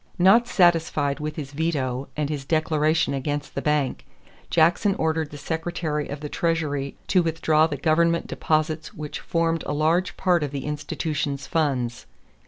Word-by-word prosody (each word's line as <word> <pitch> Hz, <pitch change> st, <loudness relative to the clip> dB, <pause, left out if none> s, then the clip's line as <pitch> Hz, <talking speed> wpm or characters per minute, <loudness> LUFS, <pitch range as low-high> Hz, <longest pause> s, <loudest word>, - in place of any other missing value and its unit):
Not 195 Hz, +7 st, +5 dB
satisfied 165 Hz, -7 st, +2 dB
with 150 Hz, 0 st, -4 dB
his 140 Hz, -3 st, -6 dB
veto 140 Hz, -4 st, -1 dB
and 150 Hz, -1 st, 0 dB
his 145 Hz, -2 st, -4 dB
declaration 155 Hz, 0 st, +1 dB
against 145 Hz, +2 st, -3 dB
the -, -, -3 dB
bank, 150 Hz, -3 st, 0 dB, 0.5 s
Jackson 175 Hz, +5 st, +3 dB
ordered 160 Hz, -1 st, 0 dB
the 145 Hz, -, -9 dB
Secretary 160 Hz, 0 st, -3 dB
of 145 Hz, +1 st, -6 dB
the 150 Hz, -, -4 dB
Treasury 145 Hz, -4 st, -1 dB
to 185 Hz, -, +3 dB
withdraw 160 Hz, -1 st, +2 dB
the 150 Hz, -3 st, -4 dB
government 170 Hz, +3 st, +2 dB
deposits 155 Hz, 0 st, -1 dB
which 150 Hz, -1 st, -6 dB
formed 165 Hz, -1 st, 0 dB
a -, -, -1 dB
large 160 Hz, +5 st, +1 dB
part 180 Hz, -3 st, +2 dB
of 145 Hz, -, -1 dB
the 140 Hz, -1 st, -5 dB
institution's 145 Hz, -2 st, -3 dB
funds. 130 Hz, -7 st, -1 dB
155 Hz, 155 wpm, -24 LUFS, 145-165 Hz, 0.5 s, Not